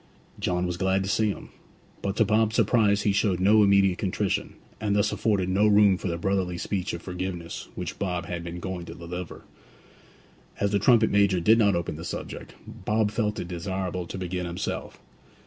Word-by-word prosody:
John 90 0 0
was 90 -1 -3
glad 95 +1 +1
to 95 - -4
see 110 0 +2
him; 100 - -6 0.5
but 100 0 -2
to 110 - +3
Bob's 110 +1 +2
surprise 105 -2 +3
he 105 - +3
showed 100 -3 +1
no 105 +3 +5
immediate 100 -2 +4
contrition, 100 0 -1 0.2
and 105 -2 0
thus 105 - +2
afforded 100 -5 0
no 100 +3 +3
room 105 -2 +5
for 95 - -5
the 85 -2 -2
brotherly 90 0 -1
speech 95 +1 -2
of 85 - -6
forgiveness 90 -2 -5
which - - -5
Bob 90 -3 -2
had 85 -1 -5
been 85 +1 -6
going 90 -1 -5
to 85 - -9
deliver. 85 +1 -7 1.2
As 100 0 +1
the 100 - +2
trumpet 110 +1 +4
major 100 -2 +3
did 110 +6 +4
not 100 -4 +4
open 85 -3 -3
the 80 - -7
subject, - - -6
Bob 110 -1 -1
felt 105 -1 -1
it - - -4
desirable 90 0 -3
to - - -6
begin 90 -1 -3
himself. 85 +2 -5
95 Hz, 190 wpm, -26 LUFS, 90-105 Hz, 1.2 s, no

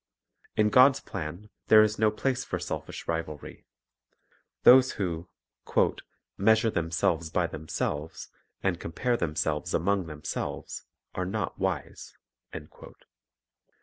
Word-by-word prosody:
In 105 0 +3
God's 130 +3 +6
plan 90 +4 -7 0.2
there 110 0 +8
is 110 0 -1
no 110 0 +4
place 125 +4 -1
for - - -3
selfish - - -6
rivalry. 80 -3 -5 1.0
Those 130 +1 +7
who 85 -3 -3 1.1
"measure 110 +2 +4
themselves 80 -1 0
by 90 +2 +1
themselves, 80 -1 -4 0.3
and 90 -3 0
compare 120 +10 -1
themselves 80 -2 -1
among 95 +1 +1
themselves, 75 -2 -5 0.3
are 90 - -2
not 95 - -3
wise." - - -4
90 Hz, 105 wpm, -28 LUFS, 80-110 Hz, 1.1 s, there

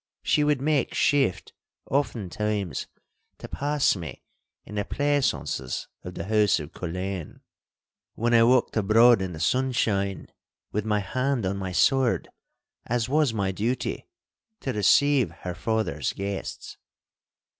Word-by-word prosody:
She 150 - +2
would 150 -3 +1
make 145 -2 +1
shift 135 -11 +1 0.4
oftentimes 105 - -1 0.5
to - - -9
pass 145 -3 +1
me 80 -8 -8 0.4
in - - -11
the 105 -1 -1
pleasaunces 145 - -1
of 90 0 -8
the - - -4
house 105 -2 +3
of 75 0 -8
Culzean, 90 0 -5 0.7
when 120 +1 0
I 115 - +6
walked 125 +2 +3
abroad 115 +2 +5
in 95 -2 -3
the 80 - -8
sunshine 100 -2 0 0.5
with 105 0 -2
my 105 -1 +1
hand 130 +2 -1
on 95 +1 -1
my 95 -1 -4
sword—as 120 0 -1
was 150 -2 +3
my 100 -3 -1
duty—to 130 - -5
receive 130 +5 +4
her 90 - -3
father's 105 - -1
guests. 100 0 -5
110 Hz, 125 wpm, -26 LUFS, 95-130 Hz, 0.7 s, I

